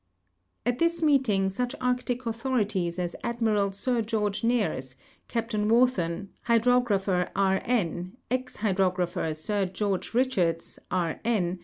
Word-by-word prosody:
At 245 Hz, +1 st, 0 dB
this 335 Hz, 0 st, +1 dB
meeting 255 Hz, -10 st, +3 dB
such 245 Hz, +7 st, -2 dB
Arctic 250 Hz, 0 st, -1 dB
authorities 220 Hz, -7 st, -1 dB
as 175 Hz, -1 st, -2 dB
Admiral 220 Hz, -4 st, +1 dB
Sir 235 Hz, +4 st, 0 dB
George 210 Hz, -2 st, -1 dB
Nares, 205 Hz, -, 0 dB, 0.3 s
Cai)tain 225 Hz, -2 st, -1 dB
Wharton, 200 Hz, -7 st, +2 dB, 0.2 s
Hydrogra])her 225 Hz, -6 st, +2 dB
II. 190 Hz, -1 st, +3 dB
N., 185 Hz, -2 st, -1 dB
ex 255 Hz, 0 st, -1 dB
Hydrographer 185 Hz, -4 st, 0 dB
Sir 195 Hz, +5 st, -1 dB
George 190 Hz, 0 st, -2 dB
Bichards, 195 Hz, -10 st, 0 dB
K. 170 Hz, -3 st, -1 dB
N. 190 Hz, -6 st, 0 dB
210 Hz, 120 wpm, -27 LUFS, 185-245 Hz, 0.3 s, meeting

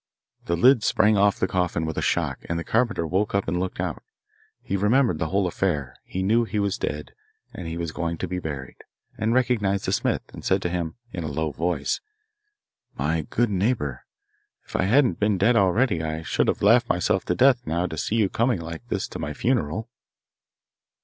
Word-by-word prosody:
The 85 Hz, -, 0 dB
lid 125 Hz, +5 st, +6 dB
sprang 105 Hz, 0 st, +3 dB
off 100 Hz, 0 st, +3 dB
the 95 Hz, -, +1 dB
coffin 90 Hz, -3 st, 0 dB
with 80 Hz, -, -2 dB
the -, -, -1 dB
shock, -, -, 0 dB
and 85 Hz, -, -1 dB
the 85 Hz, -, -3 dB
carpenter 115 Hz, -5 st, +1 dB
woke 95 Hz, +6 st, 0 dB
up 100 Hz, -, 0 dB
and 90 Hz, +2 st, 0 dB
looked 95 Hz, 0 st, -3 dB
out. -, -, -3 dB, 0.6 s
He -, -, -2 dB
remembered 105 Hz, -, +2 dB
the 80 Hz, -, 0 dB
whole 95 Hz, +3 st, +1 dB
affair; 75 Hz, -8 st, -1 dB
he 95 Hz, -, -4 dB
knew 115 Hz, +5 st, +3 dB
that 115 Hz, -, -7 dB
he 110 Hz, -, -2 dB
was 100 Hz, -2 st, 0 dB
dead 75 Hz, +1 st, -4 dB, 0.4 s
and 85 Hz, -2 st, -5 dB
was 85 Hz, -2 st, -3 dB
going 85 Hz, +1 st, -3 dB
to 95 Hz, -, -3 dB
be 90 Hz, +1 st, -3 dB
buried, 70 Hz, -6 st, -6 dB, 0.4 s
and 110 Hz, +1 st, 0 dB
recognising 105 Hz, -6 st, +1 dB
the -, -, 0 dB
smith, -, -, 0 dB
he -, -, -8 dB
said -, -, +2 dB
to 90 Hz, -, 0 dB
him, 85 Hz, -2 st, -3 dB, 0.2 s
in 85 Hz, -, -4 dB
a -, -, -3 dB
low 75 Hz, +1 st, -2 dB
voice, 80 Hz, -2 st, -1 dB, 1.0 s
'My 75 Hz, +2 st, -1 dB
good 120 Hz, -2 st, +1 dB
neighbour, 95 Hz, -, -1 dB, 0.6 s
if -, -, -11 dB
I -, -, +2 dB
hadn't 125 Hz, +5 st, +3 dB
been 105 Hz, -1 st, +2 dB
dead 115 Hz, +6 st, +3 dB
already, 100 Hz, -1 st, +3 dB
I 80 Hz, 0 st, -3 dB
should -, -, 0 dB
have -, -, 0 dB
laughed 115 Hz, +3 st, +5 dB
myself 90 Hz, -, +1 dB
to 90 Hz, -, 0 dB
death 125 Hz, 0 st, +4 dB
now 85 Hz, +3 st, 0 dB
to 80 Hz, -, -4 dB
see 105 Hz, -, -2 dB
you 110 Hz, -3 st, +3 dB
coming 115 Hz, +1 st, +1 dB
like 85 Hz, 0 st, -6 dB
this -, -, -2 dB
to -, -, -7 dB
my 75 Hz, -, -3 dB
funeral. 110 Hz, -, 0 dB
95 Hz, 205 wpm, -24 LUFS, 80-110 Hz, 1.0 s, lid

